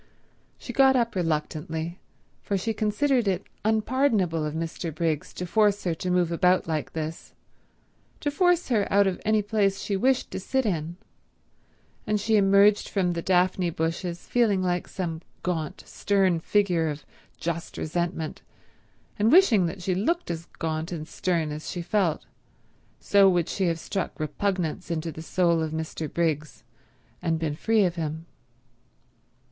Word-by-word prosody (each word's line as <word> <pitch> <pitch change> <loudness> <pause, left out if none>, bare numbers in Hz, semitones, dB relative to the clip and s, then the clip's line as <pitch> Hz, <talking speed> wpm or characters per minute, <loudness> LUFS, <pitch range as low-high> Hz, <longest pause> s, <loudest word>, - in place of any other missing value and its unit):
She - - -8
got 265 -1 +5
up 235 -2 +1
reluctantly, 160 0 -2 0.4
for 200 - -1
she 220 +4 -2
considered 225 +3 +1
it 190 0 0 0.2
unpardonable 220 - +1
of 150 0 -3
Mr. 165 +1 -4
Briggs 155 -1 -2
to 180 - -4
force 205 +2 +2
her 175 - 0
to 180 +3 -4
move 180 -2 +2
about 180 +2 +3
like 155 -2 -2
this, 160 0 -5 0.9
to 290 - 0
force 355 +1 +2
her 215 -5 +1
out 200 +1 +5
of 190 -2 -1
any 215 -1 +2
place 200 -2 +1
she 200 - -2
wished 255 +6 +1
to - - -4
sit 265 +7 -1
in; 170 -3 -2 1.1
and 210 0 +1
she 220 +2 +1
emerged 200 +1 +4
from 180 -3 0
the 170 - -3
daphne 180 0 +2
bushes 165 +2 -3
feeling 215 -6 +2
like 175 -1 -1
some 165 -4 -4 0.2
gaunt, 165 -4 -3
stern 190 -4 +1
figure 175 -3 +1
of 150 0 -6 0.3
just 170 0 -4
resentment 165 -1 -3 0.8
and 215 +3 +4
wishing 240 - +6
that 180 +2 -6
she 185 - 0
looked 280 - 0
as 165 0 -6
gaunt 160 +1 -3
and 155 -3 -5
stern 170 -5 -1
as 150 +1 -6
she 175 - -4
felt; 185 -4 0 0.7
so 200 -1 +5
would 175 -3 +1
she 195 - -1
have 165 -1 0
struck 190 +2 -4
repugnance 170 +2 -2
into 165 0 -2
the 160 - -8
soul 170 0 +1
of 160 - -1
Mr. 160 -1 -4
Briggs, 155 -3 -1 0.6
and 165 -1 0
been 160 -2 -2
free 220 +5 +2
of 175 -1 -2
him. 160 0 -4
180 Hz, 155 wpm, -26 LUFS, 165-205 Hz, 1.1 s, wishing